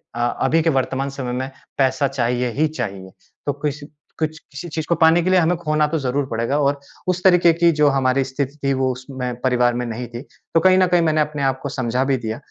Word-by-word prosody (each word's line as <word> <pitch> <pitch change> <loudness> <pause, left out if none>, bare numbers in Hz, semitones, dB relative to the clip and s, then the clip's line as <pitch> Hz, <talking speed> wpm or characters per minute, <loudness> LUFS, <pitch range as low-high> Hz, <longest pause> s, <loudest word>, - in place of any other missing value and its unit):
अ, - - -5 0.2
अभी 155 +5 +3
के 165 - +2
वर्तमान 135 -1 -1
समय 135 -3 -5
में 130 +2 -3 0.3
पैसा 135 0 +2
चाहिए 125 -2 -1
ही 155 +7 +1
चाहिए। 95 -11 -6 0.3
तो 145 - 0
कुछ, 145 +1 -4 0.4
कुछ 155 0 -1
किसी 145 +5 -10
चीज़ 155 0 -3
को 170 - +3
पाने 165 +2 +6
के 185 - 0
लिए 185 0 +5
हमें 175 +1 +2
खोना 155 -2 +1
तो 160 +2 -1
ज़रूर 135 +1 -1
पड़ेगा 115 +4 -1
और 140 0 +1 0.3
उस 180 0 0
तरीके 180 -2 +6
की 170 +1 +3
जो 150 - +5
हमारी 135 -1 +2
स्थिति 135 +2 -4
थी, 140 0 +2
वो 130 -1 +1
उसमें 125 -1 -5
परिवार 125 -2 +2
में 120 +1 -2
नहीं 120 +1 -5
थी। 120 +1 -8 0.3
तो 165 - +5
कहीं 185 +2 +5
न 185 -1 +4
कहीं 175 -1 +3
मैंने 155 -2 +2
अपने 150 -1 -2
आप 135 -1 0
को 140 - -3
समझा 125 -1 -1
भी 135 0 +1
दिया। 110 -2 -4
140 Hz, 235 wpm, -21 LUFS, 130-155 Hz, 0.4 s, पाने